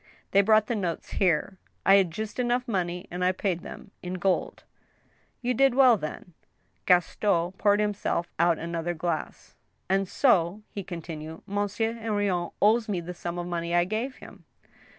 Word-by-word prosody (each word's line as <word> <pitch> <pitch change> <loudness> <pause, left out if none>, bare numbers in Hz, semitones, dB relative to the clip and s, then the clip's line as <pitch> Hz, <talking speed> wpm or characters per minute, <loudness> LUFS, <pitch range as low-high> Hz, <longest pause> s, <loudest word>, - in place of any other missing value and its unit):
They 200 - +6
brought 215 +1 +4
the 235 - -2
notes 180 -6 -3
here. 185 +1 +1 0.3
I 195 - +7
had 190 -3 +3
just 215 +8 -6
enough 245 0 0
money, 180 -4 -2
and 180 +1 -3
I 180 - +4
paid 185 -2 -1
them, 195 - -10
in 180 +1 -4
gold." 185 +1 -1 0.8
"You 250 +1 +1
did 270 +1 +3
well, 260 -3 +7
then." 175 0 -7 0.5
Gaston 175 0 +2
poured 205 +2 +2
himself 205 -4 -1
out 170 -1 +4
another 170 +1 -3
glass. 165 0 -4 0.2
" - - -45
And 195 0 +2
so," 200 -5 +2
he 200 - -5
continued, 160 -3 -7
" - - -42
Monsieur 205 +3 -1
Henrion 205 -6 -1
owes 220 +2 +3
me 190 -4 0
the 175 +1 -6
sum 175 0 -5
of 175 - -3
money 170 -1 -2
I 175 0 +4
gave 225 +7 -3
him - - -14
185 Hz, 170 wpm, -27 LUFS, 175-215 Hz, 0.8 s, I